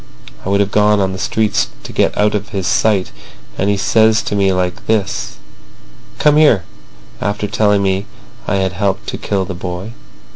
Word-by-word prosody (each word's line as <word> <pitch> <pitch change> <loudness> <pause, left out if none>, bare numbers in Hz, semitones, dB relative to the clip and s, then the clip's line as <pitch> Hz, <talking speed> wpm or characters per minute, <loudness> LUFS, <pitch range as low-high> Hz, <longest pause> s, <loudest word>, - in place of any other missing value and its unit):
I - - -4
would 100 +1 +3
have 100 0 -1
gone 105 0 +3
on 95 -1 0
the 95 - -6
streets 110 +1 0 0.2
to - - -9
get - - +1
out 105 0 +2
of 105 0 -3
his 100 -4 -3
sight. 100 0 +1 0.4
And 100 - 0
he 100 - +1
says 110 +1 +3
to 105 - -3
me 100 -1 +2
like 90 -1 -2
this: 105 -3 -1 0.8
'Come 150 0 +4
here,' 145 - +5 0.6
after 105 0 -1
telling 105 -2 +2
me 95 +1 0 0.4
I 105 - +1
had 95 -1 0
helped 95 +1 -1
to - - -5
kill 95 -2 -1
the 95 - -5
boy. 90 +4 -6
100 Hz, 185 wpm, -16 LUFS, 95-105 Hz, 0.8 s, here